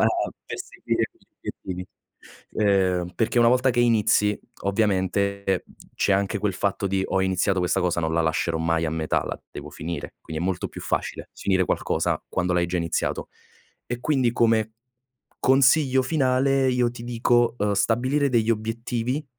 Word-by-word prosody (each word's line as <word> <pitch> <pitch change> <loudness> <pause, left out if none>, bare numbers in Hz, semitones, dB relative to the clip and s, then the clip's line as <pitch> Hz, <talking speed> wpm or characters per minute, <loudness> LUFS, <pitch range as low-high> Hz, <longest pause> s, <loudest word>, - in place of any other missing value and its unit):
fa - - +5
a - - +1 0.2
perseguire - - -3
gli - - -31
obiettivi. 90 0 -6 0.7
Ehm, 95 -4 +2
perché 120 +1 +1
una 115 - +6
volta 125 +1 +3
che 120 0 +1
inizi, 110 -3 +3 0.2
ovviamente 100 -1 0 0.3
c'è 100 - +2
anche 100 +1 +1
quel 100 -2 -1
fatto 100 +1 -1
di: 95 0 0
"Ho 95 - 0
iniziato 95 0 +1
questa 90 -1 +1
cosa, 85 -1 0
non 80 -1 -1
la 85 - +2
lascerò 80 +1 0
mai 80 0 +1
a 80 - -1
metà, 80 -1 -1
la - - -5
devo - - -8
finire". 85 -2 -6
Quindi 80 0 -6
è - - 0
molto 90 -2 -2
più - - -9
facile - - -3
finire 95 -2 +1
qualcosa - - -1
quando 90 0 -1
l'hai 90 -1 +2
già 90 +1 -2
iniziato. 85 -1 -2 0.6
E 120 0 -3
quindi, 130 -4 +1
come 110 -2 +2 0.7
consiglio 135 +1 +4
finale 135 -1 +2
io 125 -1 +2
ti 115 - -9
dico, 120 0 +2
uhm, 105 0 +1
stabilire 130 +8 +1
degli 115 -3 +2
obiettivi, 115 +5 -2
105 Hz, 165 wpm, -24 LUFS, 90-120 Hz, 0.7 s, una